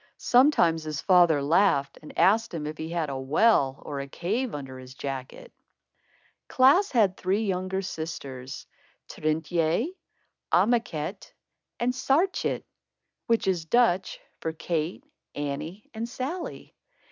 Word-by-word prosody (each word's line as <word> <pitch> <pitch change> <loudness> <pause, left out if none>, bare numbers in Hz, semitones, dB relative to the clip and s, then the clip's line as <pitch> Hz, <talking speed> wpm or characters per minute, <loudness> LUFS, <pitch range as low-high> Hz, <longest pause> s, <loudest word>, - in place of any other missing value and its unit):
Sometimes 245 - +4
his 155 -1 -4
father 175 -6 +4
laughed 145 -3 +2
and 155 - -12
asked 220 +4 +4
him 155 -2 -4
if 155 +1 -6
he 160 - -4
had 165 -4 -2
a 135 - -4
well, 135 -1 +2
or 145 -1 -4
a 140 - -5
cave, 215 - -2
under 135 -2 -7
his 130 0 -12
jacket. 135 - -6 0.9
Klaas 285 +11 +4
had 210 -7 +3
three 195 +4 0
younger 190 0 -2
sisters, 140 -7 -6 0.4
Trintjé, 160 - 0 0.6
Anneké 195 -3 0 0.5
and 245 +1 +1
Saartjé; 310 +9 +1 0.6
which 230 -2 +2
is 175 -4 0
Dutch 190 -2 +2 0.2
for 160 - -3
Kate, 165 +1 -3 0.3
Annie 145 +7 -5
and 230 +2 -4
Sallie. 285 +9 -5
175 Hz, 125 wpm, -27 LUFS, 150-225 Hz, 0.9 s, Sometimes